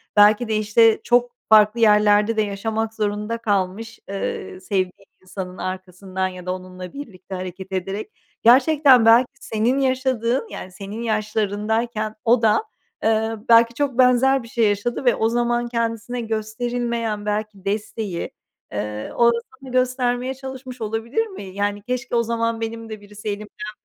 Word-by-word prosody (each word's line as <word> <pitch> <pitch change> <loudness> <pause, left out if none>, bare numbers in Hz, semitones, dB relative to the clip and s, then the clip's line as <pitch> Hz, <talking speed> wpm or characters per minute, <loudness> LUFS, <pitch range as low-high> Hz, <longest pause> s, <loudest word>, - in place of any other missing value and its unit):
belki 210 +3 +6
de, 220 - 0
işte, 215 +1 +4
çok 245 0 +3 0.2
farklı 215 +1 +6
yerlerde 210 0 +4
de 215 - +2
yaşamak 220 +2 -2
zorunda 210 +1 -2
kalmış, 205 0 -2
ııı, 190 -1 -4
sevdiği 185 0 -2 0.2
insanın 185 0 -7
arkasından 185 0 -4
ya 185 -1 -9
da 180 - -1
onunla 185 0 -9
birlikte 200 -9 -8
hareket 185 +1 -7
ederek. 195 - -3 0.3
Gerçekten 260 0 +6
belki 235 +2 +6
senin 230 +5 0
yaşadığın, 260 - 0
yani 185 - -7
senin 200 +4 -7
yaşlarındayken 215 0 -1
o 235 0 +4
da, 225 - +3 0.4
ııı, 220 0 0
belki 230 0 +6
çok 275 -1 -1
benzer 255 +1 +4
bir - - -11
şey 230 -2 +2
yaşadı 205 +6 -2
ve 245 - +5
o 220 - +1
zaman 240 0 0
kendisine 230 +1 -2
gösterilmeyen 225 0 -2
belki 210 -2 -3
desteği, 205 -2 -3 0.4
ııı, 105 +1 -4
o 235 0 +5
da 235 - -1 0.2
sana 270 -1 -11
göstermeye 255 0 0
çalışmış 260 -2 -9
olabilir 225 - -1
mi? 380 - -9
Yani 205 +2 -2
keşke 250 +2 -3
o 235 - +3
zaman 230 0 -1
benim 225 0 -5
de 215 -1 -7
birisi 210 +1 -11
elimden 210 +1 -6
220 Hz, 150 wpm, -22 LUFS, 205-240 Hz, 0.4 s, belki